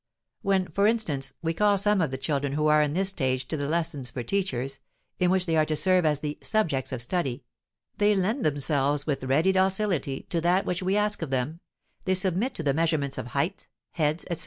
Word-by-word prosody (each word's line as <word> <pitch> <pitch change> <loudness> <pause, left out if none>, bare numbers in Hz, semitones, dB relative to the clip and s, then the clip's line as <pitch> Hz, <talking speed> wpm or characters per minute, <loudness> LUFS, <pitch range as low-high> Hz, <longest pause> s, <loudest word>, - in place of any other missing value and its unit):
When, 190 -2 +1
for 200 +5 +2
instance, 150 - 0
we 165 0 0
call 205 +3 +3
some 205 0 +2
of 160 - +1
the 130 - -4
children 140 0 -1
who 150 +1 0
are 150 0 +5
in 150 -1 0
this 190 +3 +1
stage 130 -8 -1
to - - -1
the 145 -2 -2
lessons 160 -6 -1
for 120 -1 -5
teachers, 135 - -2 0.4
in 180 - +3
which 185 0 +2
they 165 -3 0
are 155 -1 +4
to 155 - 0
serve 185 0 +3
as 150 -1 +1
the 150 -1 -4
"subjects 160 - 0
of 125 -2 -1
study," 135 -4 -2 0.6
they 210 0 +4
lend 215 +7 0
themselves 145 -1 +1
with 145 -4 -2
ready 150 +8 +3
docility 190 -7 +1
to 170 - 0
that 180 +3 +2
which 180 +1 -2
we 190 +2 +1
ask 210 -1 0
of 165 - -3
them, 135 +5 -2 0.5
they 190 -1 +2
submit 190 +7 0
to 165 - -4
the 140 -2 +2
measurements 145 -4 0
of 125 - -5
height, 150 +10 -2 0.2
heads, 155 0 0
etc. 170 - -2
160 Hz, 215 wpm, -26 LUFS, 140-190 Hz, 0.6 s, are